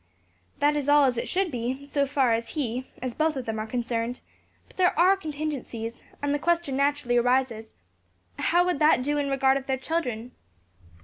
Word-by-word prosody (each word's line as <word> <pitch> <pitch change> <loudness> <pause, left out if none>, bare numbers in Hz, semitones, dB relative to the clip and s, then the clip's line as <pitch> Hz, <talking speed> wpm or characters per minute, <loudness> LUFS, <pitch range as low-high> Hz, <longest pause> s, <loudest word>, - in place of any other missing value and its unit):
"That 295 +1 +2
is 290 -1 -1
all 290 -1 +6
as 255 -2 +1
it 235 - -3
should 370 -1 0
be, 255 +3 -3
so 285 0 0
far 265 -4 +2
as 230 0 -2
he 255 -2 -2 0.2
as 255 -2 -3
both 310 +2 +1
of 260 -2 -4
them 220 -1 -3
are 215 - -4
concerned; 235 0 -2 0.5
but - - -22
there 360 -4 +3
are 365 +4 +6
contingencies; 285 -9 -5 0.2
and 285 0 +1
the 290 - 0
question 340 -3 0
naturally 280 -3 +1
arises, 240 -2 +1 0.7
How 350 +1 +3
would 360 -5 0
that 300 -4 +4
do 290 +2 0
in 285 -1 -1
regard 270 0 +3
of 270 - -7
their 265 -1 0
children?" 250 -5 -3
270 Hz, 190 wpm, -26 LUFS, 245-295 Hz, 0.7 s, all